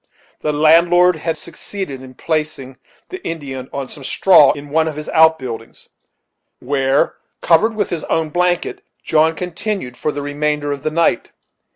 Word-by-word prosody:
The 150 Hz, -, -1 dB
landlord 170 Hz, +3 st, +4 dB
had 160 Hz, +1 st, -3 dB
succeeded 155 Hz, -3 st, -7 dB
in 130 Hz, -1 st, -12 dB
placing 150 Hz, -5 st, -3 dB, 0.3 s
the 370 Hz, +1 st, -8 dB
Indian 135 Hz, -5 st, -6 dB
on 140 Hz, -1 st, -4 dB
some 140 Hz, -, -10 dB
straw 155 Hz, 0 st, +5 dB
in 145 Hz, 0 st, -8 dB
one 160 Hz, +1 st, +2 dB
of 155 Hz, -, -4 dB
his 150 Hz, 0 st, -7 dB
outbuildings, 135 Hz, -9 st, +1 dB, 0.7 s
where, 135 Hz, +1 st, 0 dB, 0.2 s
covered 215 Hz, +7 st, +3 dB
with 205 Hz, -3 st, -2 dB
his 165 Hz, -3 st, -3 dB
own 160 Hz, -1 st, -1 dB
blanket, 175 Hz, +1 st, 0 dB, 0.2 s
John 160 Hz, +1 st, +2 dB
continued 180 Hz, -, -4 dB
for 150 Hz, -, -2 dB
the 145 Hz, -1 st, -5 dB
remainder 145 Hz, 0 st, -1 dB
of 140 Hz, -1 st, -4 dB
the 155 Hz, -, -1 dB
night. 160 Hz, -6 st, +1 dB
155 Hz, 155 wpm, -18 LUFS, 140-170 Hz, 0.7 s, straw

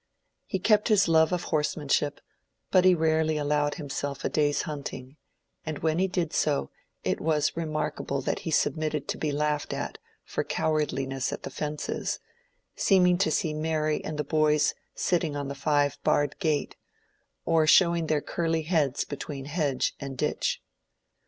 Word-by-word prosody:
He 190 Hz, -, -1 dB
kept 210 Hz, +3 st, +3 dB
his 210 Hz, -3 st, +4 dB
love 160 Hz, 0 st, +4 dB
of 180 Hz, -1 st, -1 dB
horsemanship, 150 Hz, -2 st, 0 dB, 0.5 s
but 185 Hz, -1 st, +5 dB
he 185 Hz, -1 st, +7 dB
rarely 160 Hz, -1 st, +2 dB
allowed 145 Hz, 0 st, +1 dB
himself 145 Hz, -2 st, -4 dB
a -, -, +1 dB
day's 145 Hz, -1 st, +1 dB
hunting; 140 Hz, -2 st, -6 dB, 0.5 s
and 155 Hz, -2 st, -4 dB
when 160 Hz, +2 st, 0 dB
he 190 Hz, -, +3 dB
did 175 Hz, -3 st, -2 dB
so, 145 Hz, -2 st, 0 dB, 0.3 s
it -, -, -1 dB
was 155 Hz, -2 st, +1 dB
remarkable 155 Hz, -3 st, -2 dB
that -, -, -1 dB
he -, -, -5 dB
submitted 155 Hz, -1 st, 0 dB
to -, -, -1 dB
be 155 Hz, -, 0 dB
laughed 150 Hz, 0 st, -1 dB
at -, -, -4 dB, 0.3 s
for -, -, -2 dB
cowardliness 135 Hz, -4 st, -1 dB
at -, -, -6 dB
the -, -, -6 dB
fences, 150 Hz, 0 st, -3 dB, 0.6 s
seeming 180 Hz, -2 st, +4 dB
to 195 Hz, -, +3 dB
see 155 Hz, 0 st, 0 dB
Mary 155 Hz, 0 st, -1 dB
and 155 Hz, -, -4 dB
the 150 Hz, -, 0 dB
boys 150 Hz, -1 st, +2 dB, 0.2 s
sitting 165 Hz, -4 st, 0 dB
on 140 Hz, -1 st, -3 dB
the -, -, -3 dB
five 145 Hz, 0 st, +1 dB
barred 145 Hz, -1 st, +1 dB
gate, 155 Hz, -5 st, 0 dB, 0.7 s
or 160 Hz, -2 st, +3 dB
showing 170 Hz, -1 st, +5 dB
their 155 Hz, -2 st, +1 dB
curly 165 Hz, 0 st, -1 dB
heads 150 Hz, -5 st, +1 dB
between 140 Hz, -1 st, -6 dB
hedge 145 Hz, -3 st, 0 dB
and 135 Hz, -2 st, -6 dB
ditch. -, -, -1 dB
155 Hz, 160 wpm, -27 LUFS, 145-165 Hz, 0.7 s, he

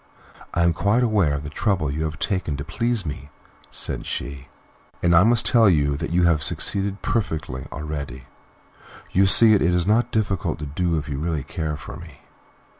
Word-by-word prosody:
"I 85 Hz, -, +2 dB
am 85 Hz, 0 st, +3 dB
quite 105 Hz, +9 st, +1 dB
aware 100 Hz, -11 st, +2 dB
of 70 Hz, -, -5 dB
the 75 Hz, -, -7 dB
trouble 90 Hz, -7 st, 0 dB
you 80 Hz, +3 st, -2 dB
have 80 Hz, 0 st, -4 dB
taken 95 Hz, -8 st, -2 dB
to 70 Hz, -, -5 dB
please 115 Hz, +5 st, -1 dB
me," 70 Hz, -2 st, -6 dB, 0.4 s
said -, -, -2 dB
she, 70 Hz, -1 st, -5 dB, 0.6 s
"and 85 Hz, 0 st, +4 dB
I 85 Hz, -, +7 dB
must 115 Hz, +2 st, +3 dB
tell 115 Hz, -4 st, +5 dB
you 75 Hz, -4 st, +2 dB
that 80 Hz, +3 st, -4 dB
you 90 Hz, +1 st, +2 dB
have 85 Hz, -3 st, +3 dB
succeeded 100 Hz, +7 st, -1 dB
perfectly 80 Hz, -, -2 dB
already. 75 Hz, -4 st, -6 dB, 0.9 s
You 95 Hz, +1 st, +4 dB
see 110 Hz, +3 st, +7 dB
it 100 Hz, -, +3 dB
is 90 Hz, +1 st, +2 dB
not 110 Hz, +4 st, +2 dB
difficult 100 Hz, -6 st, -1 dB
to 75 Hz, -, -6 dB
do 80 Hz, +3 st, -1 dB
if 75 Hz, -, -4 dB
you 70 Hz, -2 st, -4 dB
really 80 Hz, -2 st, -2 dB
care 75 Hz, +1 st, -4 dB
for 70 Hz, -, -9 dB
me." -, -, -13 dB
85 Hz, 190 wpm, -23 LUFS, 75-100 Hz, 0.9 s, I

